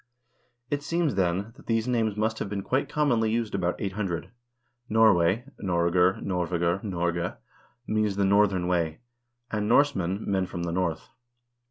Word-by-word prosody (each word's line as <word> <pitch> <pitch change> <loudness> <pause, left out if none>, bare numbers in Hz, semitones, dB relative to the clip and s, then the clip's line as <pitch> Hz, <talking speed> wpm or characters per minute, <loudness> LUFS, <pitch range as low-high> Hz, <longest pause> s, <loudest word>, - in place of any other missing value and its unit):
It 145 0 0
seems, 165 0 0
then, 95 +3 0
that - - -17
these 115 0 +1
names 110 -4 0
must 110 +1 0
have 100 - -3
been 100 -1 -3
quite 130 +6 0
commonly 120 -7 +2
used 115 -1 -1
about 90 -2 -1
800. 95 -3 -3 0.6
Norway 110 -1 +4 0.2
(Noregr, 90 0 +2
Norvegr, 90 0 0
Norge) 85 -3 -2 0.5
means 110 -2 0
the 100 0 +1
northern 100 -2 +3
way, 85 +1 0 0.5
and 105 -1 -1
Norsemen, 105 -8 +2
men 95 -2 0
from 85 -1 -5
the 85 - -2
North. 85 -3 -2
100 Hz, 145 wpm, -27 LUFS, 90-110 Hz, 0.6 s, Norway